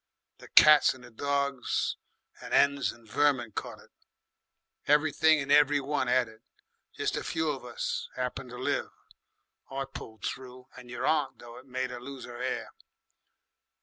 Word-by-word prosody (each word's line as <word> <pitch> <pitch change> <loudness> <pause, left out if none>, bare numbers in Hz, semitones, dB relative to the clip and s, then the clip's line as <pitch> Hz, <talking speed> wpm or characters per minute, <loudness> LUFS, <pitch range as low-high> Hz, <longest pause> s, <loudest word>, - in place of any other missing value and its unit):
The - - -13
cats 150 -3 +7
and 120 -2 -15
dogs 140 -1 -1 0.5
and - - -2
'ens 140 -1 +3
and 115 -1 -18
vermin 130 -1 +2
caught - - -5
it. - - -19 1.0
Everything 155 +1 +4
and 140 0 -3
every 145 0 +5
one 140 -1 -1
'ad 125 -1 +3
it. 110 0 -16 0.6
Jest - - -1
a - - -3
few 160 -1 -1
of 135 -3 -6
us 125 - -4
'appened 125 0 -3
to 125 - -9
live. 130 - -1 0.8
I 135 0 -3
pulled 110 -5 -9
through, 130 0 -7
and 125 -1 -12
your 120 - -4
aunt, 150 -4 +1
though 120 0 -11
it 130 - -18
made 130 0 -3
'er 120 -1 -7
lose 135 +1 -8
'er 120 0 -9
'air. 125 -1 -3
130 Hz, 160 wpm, -29 LUFS, 125-140 Hz, 1.0 s, cats